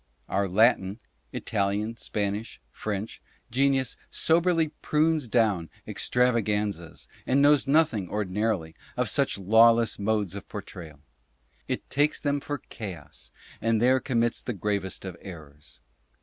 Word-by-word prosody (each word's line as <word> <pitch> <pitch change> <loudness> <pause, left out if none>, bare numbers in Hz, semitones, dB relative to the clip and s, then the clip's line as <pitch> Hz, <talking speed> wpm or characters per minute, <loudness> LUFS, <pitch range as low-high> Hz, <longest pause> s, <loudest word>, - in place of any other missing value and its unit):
Our 100 0 0
Latin 100 -1 +3 0.3
[Italian, 105 +1 -1
Spanish, 105 +1 -3
French] 105 - -5 0.3
genius 135 -1 +1
soberly 165 -1 +2
prunes 155 -2 +1
down 105 -8 +1 0.2
extravaganzas, 105 -8 0 0.2
and 135 - +3
knows 145 0 +4
nothing, 135 - +2
ordinarily, 105 -4 -1 0.2
of - - +1
such - - +1
lawless 115 +4 +4
modes 105 -3 0
of 100 -2 -8
portrayal. 80 -4 -9 0.7
It - - -3
takes 145 +2 +2
them 145 -1 0
for 145 +1 -4
chaos, 100 -7 -8 0.3
and 115 -1 +2
there 130 +3 +4
com 125 -3 0
mits 120 0 0
the 125 - -3
gravest 100 -1 -3
of 95 -2 -6
errors. 75 -6 -11
110 Hz, 120 wpm, -27 LUFS, 100-130 Hz, 0.7 s, knows